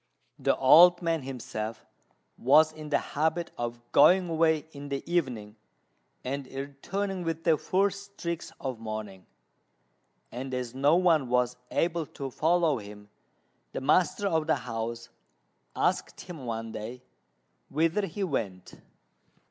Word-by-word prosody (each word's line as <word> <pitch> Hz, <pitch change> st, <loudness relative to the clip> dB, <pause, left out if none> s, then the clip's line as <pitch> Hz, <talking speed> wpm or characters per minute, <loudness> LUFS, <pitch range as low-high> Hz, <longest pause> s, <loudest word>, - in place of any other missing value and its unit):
The -, -, +2 dB
old 175 Hz, +6 st, +7 dB
man 165 Hz, -2 st, 0 dB
himself 115 Hz, -4 st, -6 dB, 0.5 s
was 155 Hz, +5 st, +5 dB
in 155 Hz, -1 st, -9 dB
the 145 Hz, -, +3 dB, 0.2 s
habit 160 Hz, +3 st, 0 dB
of 120 Hz, 0 st, -4 dB
going 185 Hz, 0 st, +6 dB
away 160 Hz, -1 st, +2 dB
in 145 Hz, -1 st, -9 dB
the 140 Hz, -1 st, -3 dB
evening 125 Hz, -11 st, -2 dB, 0.7 s
and 135 Hz, +1 st, -4 dB
returning 175 Hz, +9 st, -4 dB
with 165 Hz, -1 st, -3 dB
the 165 Hz, -2 st, +4 dB
first 200 Hz, +4 st, -1 dB
streaks 170 Hz, -1 st, -4 dB
of 130 Hz, -4 st, -4 dB
morning; 110 Hz, -4 st, -6 dB, 1.0 s
and 130 Hz, +2 st, -5 dB
as 125 Hz, -2 st, -4 dB
no 140 Hz, +4 st, +3 dB
one 165 Hz, -7 st, +3 dB
was 125 Hz, 0 st, +2 dB
able 170 Hz, -2 st, 0 dB
to 135 Hz, -1 st, -7 dB
follow 160 Hz, -2 st, +2 dB
him, 105 Hz, 0 st, -12 dB, 0.6 s
the -, -, -3 dB
master 175 Hz, +8 st, +2 dB
of 160 Hz, -4 st, 0 dB
the 160 Hz, -, +3 dB
house 115 Hz, -1 st, -5 dB, 0.7 s
asked -, -, 0 dB
him 160 Hz, -9 st, -9 dB
one 115 Hz, -1 st, -4 dB
day 115 Hz, +4 st, -7 dB, 0.7 s
whither 165 Hz, +7 st, +1 dB
he 195 Hz, +4 st, -4 dB
went. 105 Hz, -, -3 dB
140 Hz, 130 wpm, -28 LUFS, 120-165 Hz, 1.0 s, old